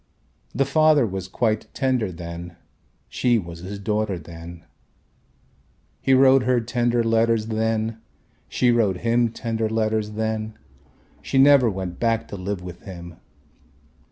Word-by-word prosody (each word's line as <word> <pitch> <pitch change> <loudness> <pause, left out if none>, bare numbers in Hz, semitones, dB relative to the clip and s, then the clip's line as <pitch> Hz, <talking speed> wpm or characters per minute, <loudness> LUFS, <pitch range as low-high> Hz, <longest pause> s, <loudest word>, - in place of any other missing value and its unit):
The 135 +3 +2
father 155 -1 +4
was 95 -3 -5
quite 110 +2 -1
tender 130 -7 0
then, 85 0 -8 0.5
she 120 -2 +1
was 85 -5 -6
his 95 +4 -7
daughter 105 -1 -1
then. 85 +1 -11 1.4
He 135 - +4
wrote 135 0 +6
her 125 0 +2
tender 120 0 0
letters 115 -1 +2
then, 110 0 -1 0.5
she 125 -1 +2
wrote 105 -6 +1
him 115 0 +2
tender 115 -2 -2
letters 110 -1 -1
then, 110 0 -3 0.6
she 135 - -2
never 135 -3 +6
went 95 -3 -5
back 115 -1 0
to - - -6
live 95 -1 -4
with 90 -1 -9
him. 85 -3 -10
110 Hz, 130 wpm, -23 LUFS, 95-120 Hz, 1.4 s, wrote